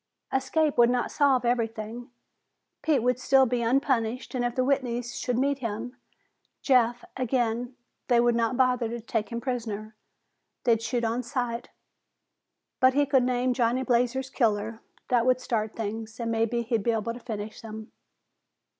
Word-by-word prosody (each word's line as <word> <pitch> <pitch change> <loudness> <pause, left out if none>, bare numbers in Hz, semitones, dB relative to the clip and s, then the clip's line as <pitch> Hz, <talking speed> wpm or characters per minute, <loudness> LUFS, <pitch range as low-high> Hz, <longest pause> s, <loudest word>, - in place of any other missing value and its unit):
Escape 270 +2 +1
would 235 0 +7
not 245 0 0
solve 270 -4 +3
everything. 230 0 -2 0.7
Pete 290 -7 +2
would 250 0 +1
still 265 +1 +5
be 245 -1 0
unpunished 250 0 0
and 250 -2 -1
if 240 -1 -1
the 255 - +2
Whitneys 245 -2 -1
should 245 -2 -1
meet 275 +1 +1
him, 230 +1 -4 0.7
Jeff, 245 -3 +3
again, 245 -1 -1 0.3
they 240 -2 +4
would 240 0 +4
not 230 +1 0
bother 250 -3 +2
to 235 +1 -4
take 225 -1 -2
him 235 - -3
prisoner. 220 -4 -4 0.7
They'd 230 -2 +3
shoot 235 +1 -1
on 230 +2 0
sight. 240 -1 -3 1.1
But 260 0 +5
he 290 0 +4
could 270 -2 +3
name 250 0 +1
Johnny 245 +1 +1
Blazer's 250 +1 +1
killer. 220 -2 0 0.3
That 245 -1 +3
would 255 0 +4
start 220 -4 -2
things, 220 +1 -5
and 230 -1 -2
maybe 230 +1 0
he'd 230 -1 0
be 235 - -1
able 225 0 0
to 240 - -9
finish 215 -3 -6
them. 220 -1 -9
240 Hz, 160 wpm, -27 LUFS, 230-255 Hz, 1.1 s, would